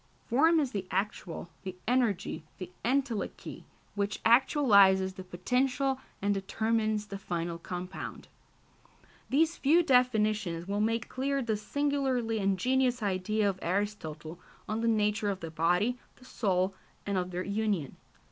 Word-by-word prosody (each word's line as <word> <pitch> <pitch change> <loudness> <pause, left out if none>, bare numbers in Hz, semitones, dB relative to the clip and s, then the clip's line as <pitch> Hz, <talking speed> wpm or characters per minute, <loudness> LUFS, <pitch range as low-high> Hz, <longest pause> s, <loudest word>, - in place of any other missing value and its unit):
Form 320 +7 +4
is 275 -5 0
the 195 -3 -4
actual, 190 -3 -3
the 185 -1 -6
energy, 240 -10 0
the 185 -1 -7
entelechy 250 -3 -2 0.3
which 200 0 -2
actualises 200 -7 +5
the 185 - -8
potential 255 +9 0 0.2
and 205 0 +2
determines 215 +2 0
the 200 -1 -7
final 170 -2 -3
compound. 180 +2 -6 1.0
These 320 +5 +2
few 325 +5 +4
definitions 215 - +2
will 200 +1 -1
make 225 +1 0
clear 275 +1 -1
the 225 -2 0
singularly 260 -1 0
ingenious 245 +5 +1
idea 205 +2 0
of 190 -2 -1
Aristotle 170 -4 -3 0.3
on 215 +1 -2
the 230 - +1
nature 210 -1 +1
of 195 -2 -2
the 165 -2 -6
body, 180 +10 +1 0.2
the 255 - -18
soul, 190 -6 0 0.3
and 200 - -1
of 180 -1 -1
their 180 0 -3
union. 200 -8 -1
210 Hz, 135 wpm, -30 LUFS, 190-250 Hz, 1.0 s, actualises